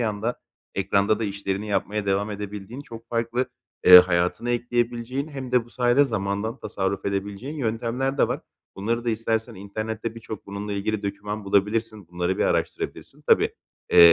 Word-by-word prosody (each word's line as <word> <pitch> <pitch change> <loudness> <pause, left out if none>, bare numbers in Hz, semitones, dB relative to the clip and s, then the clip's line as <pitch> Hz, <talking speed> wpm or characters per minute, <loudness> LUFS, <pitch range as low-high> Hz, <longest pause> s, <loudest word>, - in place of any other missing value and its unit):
yanda 110 +1 -1 0.3
ekranda 100 +2 +2
da 110 - -1
işlerini 100 0 -3
yapmaya 100 +1 -1
devam 100 +2 +1
edebildiğin 105 +4 -6
çok 115 -4 -11
farklı, 115 +2 0 0.4
eee, 90 0 +12
hayatına 90 +6 +2
ekleyebileceğin 120 +3 -1
hem 130 -3 -6
de 125 -2 +4
bu 120 - -19
sayede 125 +3 +4
zamandan 110 +1 -2
tasarruf 95 0 -2
edebileceğin 100 +8 -3
yöntemler 125 +3 -1
de - - +4
var. - - -2 0.4
Bunları 115 +4 -1
da 120 - +1
istersen 115 0 -1
internette 110 +3 -4
birçok 110 -3 -8
bununla 100 +1 -4
ilgili 105 +1 -1
doküman 105 +1 -4
bulabilirsin. 105 0 0
Bunları 90 +1 -1
bir - - +3
araştırabilirsin. - - -2
Tabii, - - +4 0.4
eee, 85 -1 +10
110 Hz, 155 wpm, -25 LUFS, 100-115 Hz, 0.4 s, eee